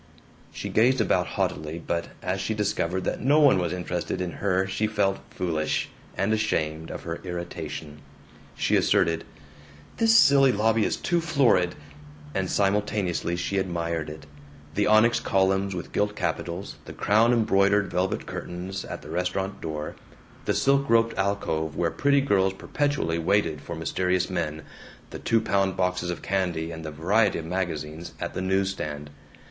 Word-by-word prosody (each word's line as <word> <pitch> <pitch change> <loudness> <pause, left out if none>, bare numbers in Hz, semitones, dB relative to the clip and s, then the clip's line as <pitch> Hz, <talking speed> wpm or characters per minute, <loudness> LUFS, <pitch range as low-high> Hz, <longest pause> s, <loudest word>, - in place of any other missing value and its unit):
She - - -5
gazed 125 +4 +3
about 110 - +2
haughtily, 75 +2 -1
but 85 0 -2 0.2
as 95 +1 -1
she 110 +3 -1
discovered 95 -3 -1
that - - -2
no 145 +4 +4
one 140 -10 +6
was 85 -2 -1
interested 90 -1 -3
in 90 -1 -2
her 95 -1 +2
she 105 +3 -1
felt 100 -3 +1
foolish, 80 -4 -1 0.3
and 105 +2 +1
ashamed 80 -7 -1
of - - -7
her 85 0 -4
irritation. 80 -4 -6 0.6
She - - +2
asserted, 85 0 +2 0.7
"This 225 0 +5
silly 140 -8 +6
lobby 110 0 +2
is - - 0
too 175 -1 0
florid," 135 - +3 0.6
and 95 -1 -1
simultaneously 100 -4 0
she 95 +2 -1
admired 85 -4 -2
it: 75 +1 -9 0.5
the 105 +3 +1
onyx 110 +3 +5
columns 95 0 +1
with 90 - -6
gilt 105 0 0
capitals, 85 +2 -3
the - - -8
crown 110 +3 +3
embroidered 100 -3 +3
velvet 90 +2 -1
curtains 90 +2 -5
at - - -7
the 75 - -10
restaurant 95 +3 -2
door, 75 -1 -4 0.5
the - - +1
silk 140 0 +2
roped 115 0 +3
alcove 80 -6 -1
where 85 -1 0
pretty 140 0 +3
girls 95 -7 +2
perpetually 140 - -1
waited 85 -4 +1
for 85 - -6
mysterious 90 +4 0
men, 80 -3 -2 0.5
the - - -6
two 115 - +2
pound 95 -3 0
boxes 90 -1 0
of 90 - -4
candy 90 -4 -1
and 80 -1 -7
the 80 - -4
variety 95 +8 +2
of 80 - -5
magazines 80 -2 -4
at - - -4
the - - -3
news 95 +1 +1
stand. 75 -5 -6
95 Hz, 160 wpm, -26 LUFS, 85-105 Hz, 0.7 s, one